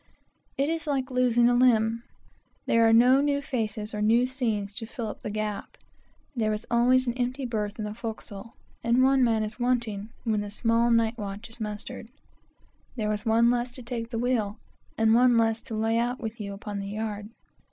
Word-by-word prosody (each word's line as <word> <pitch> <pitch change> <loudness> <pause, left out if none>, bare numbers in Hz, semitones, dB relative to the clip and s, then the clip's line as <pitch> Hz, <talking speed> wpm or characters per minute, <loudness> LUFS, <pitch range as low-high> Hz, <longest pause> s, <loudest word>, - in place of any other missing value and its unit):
It 275 - +1
is 325 0 -2
like 270 -2 -1
losing 245 -2 +3
a 245 - +4
limb. 230 -2 +3 0.6
There 230 0 +4
are - - +4
no 250 +4 +6
new 285 0 +1
faces 220 -6 -3
or 210 - -3
new 230 +4 +4
scenes 225 -6 -2
to 225 +2 -5
fill 235 0 -5
up - - -8
the - - -4
gap. 210 -1 -4 0.6
There 220 -3 +1
is 210 +2 -5
always 250 +2 +4
an 240 - -1
empty 255 +2 -2
berth 210 -3 -3
in 215 - -3
the 210 - -4
forecastle, 220 -1 -7 0.3
and 235 +2 +3
one 265 0 +4
man 220 -2 +2
wanting 235 -4 -1
when 220 -3 0
the 205 - -5
small 230 +2 +1
night 230 0 +2
watch 205 +2 -6
is 230 - -11
mustered. 215 +3 -6 0.9
There 215 -3 -1
is 210 +1 -5
one 230 +2 +4
less 245 0 0
to 250 +1 -12
take 235 -1 -5
the 230 - -4
wheel, 230 -3 0 0.4
and 225 0 +4
one 245 0 +5
less 225 0 +2
to 225 - -7
lay 225 +1 +1
out 245 +2 -1
with 225 -1 -6
you 200 -1 -5
upon 205 0 -6
the 195 - -5
yard. 210 0 -4
230 Hz, 195 wpm, -27 LUFS, 215-245 Hz, 0.9 s, no